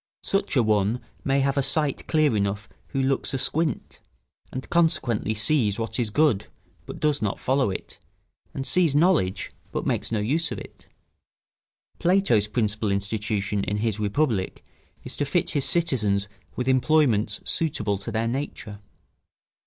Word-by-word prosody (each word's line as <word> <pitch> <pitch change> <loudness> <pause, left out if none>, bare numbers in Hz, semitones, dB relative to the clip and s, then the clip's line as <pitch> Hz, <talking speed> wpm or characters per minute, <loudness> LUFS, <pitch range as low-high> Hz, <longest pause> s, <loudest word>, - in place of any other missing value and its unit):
Such 195 -5 0
a 125 - +4
one 105 +2 +2 0.2
may 135 0 +2
have 140 +1 +1
a - - +4
sight 150 0 0
clear 155 -6 +3
enough 100 +1 -1 0.2
who 135 -2 -1
looks 135 +1 0
asquint, 150 +1 0 0.5
and 130 - -6
consequently 120 -10 +1
sees 110 -2 +2
what 115 +1 -3
is 115 -3 0
good, 110 -4 +2 0.4
but - - -7
does 150 -2 +1
not 105 -2 -1
follow 130 -3 +1
it, 95 - -6 0.5
and 135 - -4
sees 170 -4 +3
knowledge, 150 - +2 0.2
but - - -3
makes - - -1
no 115 - +1
use 150 +10 0
of - - -3
it. - - -12 1.1
Plato's 175 - +3
principal 105 -1 0
institution 100 0 -1
in 105 - -1
his 110 -1 -1
Republic 105 -2 -1 0.4
is - - -5
to - - 0
fit 150 +4 0
his 140 -3 +1
citizens 105 - +1 0.3
with 125 - -3
employments 130 -6 +3
suitable 105 -11 0
to 110 +3 -6
their 115 +1 0
nature. 120 -5 -4
120 Hz, 150 wpm, -25 LUFS, 105-145 Hz, 1.1 s, a